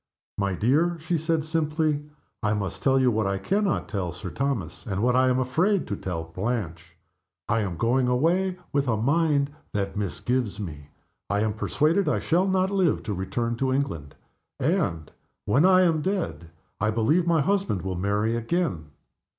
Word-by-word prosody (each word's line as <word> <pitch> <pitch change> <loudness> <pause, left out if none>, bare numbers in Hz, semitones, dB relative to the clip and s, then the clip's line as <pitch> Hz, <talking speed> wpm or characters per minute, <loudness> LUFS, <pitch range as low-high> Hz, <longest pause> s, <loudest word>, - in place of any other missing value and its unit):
"My 100 -2 0
dear," 155 - +2
she 165 +3 -1
said, 160 0 0
simply, 155 -1 0 0.4
"I 105 0 +1
must 100 -2 -3
tell 135 -1 +3
you 130 -1 +4
what 110 -2 0
I 100 0 0
can 200 - 0
not 175 - 0
tell 95 -4 -3
Sir 90 0 -7
Thomas, 120 - -3
and 100 0 -1
what 125 0 +3
I 130 0 +4
am 125 - +2
afraid 165 +10 +1
to 100 - -3
tell 90 -4 -4
Blanche. 90 -2 -4 0.5
I 115 0 +2
am 95 -6 -2
going 125 +4 +2
away, 175 +9 +1 0.2
with 140 -1 +1
a 115 -3 +1
mind 145 +3 +2 0.2
that 100 -1 -2
misgives 105 +2 -2
me. 75 -7 -7 0.4
I 100 0 +1
am 110 -1 0
persuaded 155 - +1
I - - +1
shall 180 +4 +1
not 190 0 +1
live 190 -5 +1
to 105 - -3
return 115 +6 -2
to 130 +1 0
England; 130 - -2 0.4
and, 130 - 0 0.3
when 135 - +3
I 185 0 +6
am 165 -3 +2
dead, 180 - -2 0.3
I 105 - +1
believe 120 +11 +2
my 165 -2 +3
husband 195 - 0
will 95 -1 -2
marry 105 +5 0
again. 115 - -1
125 Hz, 175 wpm, -26 LUFS, 100-160 Hz, 0.5 s, I